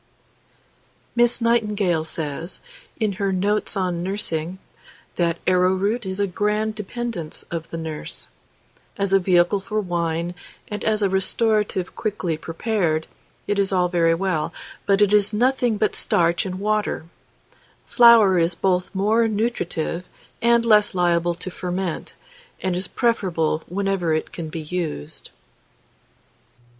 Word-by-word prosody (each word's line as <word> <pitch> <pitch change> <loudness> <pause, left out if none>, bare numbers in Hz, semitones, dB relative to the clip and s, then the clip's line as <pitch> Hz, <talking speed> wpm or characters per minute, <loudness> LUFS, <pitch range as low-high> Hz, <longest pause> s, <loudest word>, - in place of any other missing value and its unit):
MISS 240 +1 +3
NIGHTINGALE 210 -8 +1
says, 160 +2 -4 0.4
in 215 -3 +1
her 195 -1 +1
"Notes 205 +3 0
on 180 -3 -1
Nursing," 180 -2 -2 0.6
that 170 -1 +1
arrowroot 190 +4 +2
is 190 +1 -3
a 200 - +3
grand 210 +3 0
dependence 215 -5 -5
of 165 -1 -4
the 165 - -5
nurse. 160 -2 -6 0.7
As 200 -1 0
a 195 - +6
vehicle 180 +1 +3
for 215 +2 -2
wine, 170 -2 -1 0.4
and 210 -1 -4
as 215 -1 +1
a - - +4
restorative 205 0 0
quickly 195 -7 -2
prepared, 165 -1 -1 0.4
it 205 -1 0
is 195 0 +2
all 180 -2 +2
very 165 -2 +3
well, 175 -3 -1 0.4
but 200 +1 +4
it 205 0 +2
is 210 0 +4
nothing 245 0 +2
but 215 0 +1
starch 170 +2 +1
and 185 0 -5
water; 210 -4 -1 0.8
flour 230 -6 +6
is 165 +1 +1
both 180 0 +1
more 220 +4 +3
nutritive 205 -6 -2 0.4
and 235 0 +4
less 210 -3 +4
liable 175 -1 +2
to 180 +2 -6
ferment, 180 -1 -4 0.4
and 185 -1 -1
is 185 +1 -1
preferable 180 -11 0
wherever 190 -3 0
it 155 - -3
can 165 -2 -6
be 160 +1 -5
used. 155 - -5
190 Hz, 130 wpm, -22 LUFS, 170-210 Hz, 0.8 s, a